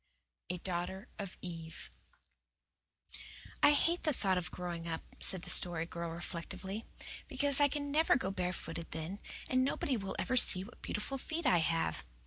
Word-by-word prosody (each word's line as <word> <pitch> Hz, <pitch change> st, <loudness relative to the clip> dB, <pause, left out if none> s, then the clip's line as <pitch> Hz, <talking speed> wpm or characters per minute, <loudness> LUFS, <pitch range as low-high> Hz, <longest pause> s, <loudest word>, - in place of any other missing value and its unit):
A 180 Hz, -, -2 dB
DAUGHTER 185 Hz, +4 st, -4 dB
OF 195 Hz, -2 st, -6 dB
EVE 165 Hz, -2 st, -7 dB, 1.7 s
"I 290 Hz, -, +7 dB
hate 335 Hz, +4 st, +2 dB
the 305 Hz, -, +1 dB
thought 195 Hz, -6 st, +1 dB
of 180 Hz, -, -5 dB
growing 175 Hz, -2 st, -5 dB
up," 165 Hz, -1 st, -4 dB, 0.2 s
said 185 Hz, -2 st, +6 dB
the -, -, +1 dB
Story 170 Hz, -2 st, +5 dB
Girl 170 Hz, 0 st, -5 dB
reflectively, 175 Hz, +5 st, -5 dB, 0.4 s
"because 285 Hz, 0 st, +3 dB
I 290 Hz, -, +6 dB
can 285 Hz, 0 st, -4 dB
never 315 Hz, +3 st, +4 dB
go 260 Hz, -8 st, -1 dB
barefooted 180 Hz, -3 st, -4 dB
then, 160 Hz, +5 st, -5 dB, 0.3 s
and 255 Hz, 0 st, +2 dB
nobody 270 Hz, -1 st, -1 dB
will 195 Hz, -2 st, -5 dB
ever 255 Hz, -, 0 dB
see 185 Hz, -6 st, +7 dB
what 230 Hz, +5 st, -14 dB
beautiful 270 Hz, +6 st, -4 dB
feet 320 Hz, +4 st, -5 dB
I 245 Hz, -9 st, +4 dB
have." 165 Hz, -, -1 dB
190 Hz, 160 wpm, -33 LUFS, 170-260 Hz, 1.7 s, I